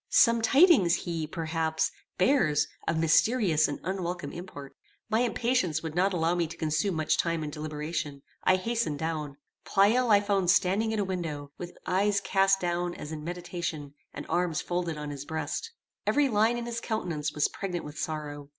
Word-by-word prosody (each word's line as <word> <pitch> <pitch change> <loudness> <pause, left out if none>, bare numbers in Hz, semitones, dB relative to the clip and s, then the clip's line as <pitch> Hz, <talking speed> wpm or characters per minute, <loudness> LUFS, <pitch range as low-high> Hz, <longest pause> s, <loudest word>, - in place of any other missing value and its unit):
Some 230 -1 +5
tidings 265 - +5
he, 165 -3 -3
perhaps, 160 -1 -1 0.3
bears 170 - +3 0.2
of 165 - +1
mysterious 165 0 +3
and 145 - -4
unwelcome 175 -5 -3
import. 145 -6 -9 0.4
My 220 - +3
impatience 235 - +1
would 160 -1 -4
not 185 +4 +2
allow 170 -2 +1
me 175 -2 0
to 165 +2 -10
consume 160 +5 0
much 155 -1 +1
time 165 -2 0
in 150 - -4
deliberation: 150 -1 -4 0.2
I 185 - +5
hastened 210 -5 -1
down. 150 -2 -3 0.3
Pleyel 225 +5 +3
I 205 -2 +7
found 200 -3 0
standing 200 +4 +3
at 220 - -1
a 205 - +1
window, 160 -6 -4
with 175 0 -8
eyes 200 +2 +2
cast 195 -1 +3
down 175 0 -1
as 150 - -7
in 155 -1 -6
meditation, 170 -4 -5 0.2
and - - -7
arms 175 -3 0
folded 175 -3 -2
on 150 -1 -5
his 140 -1 -6
breast. 160 - -4 0.4
Every 290 -1 +3
line 225 +2 +3
in 240 - -4
his 235 -1 -4
countenance 165 -9 -2
was 150 - +3
pregnant 180 -3 -5
with 150 +1 -8
sorrow. 145 -2 -5
175 Hz, 175 wpm, -28 LUFS, 155-200 Hz, 0.4 s, I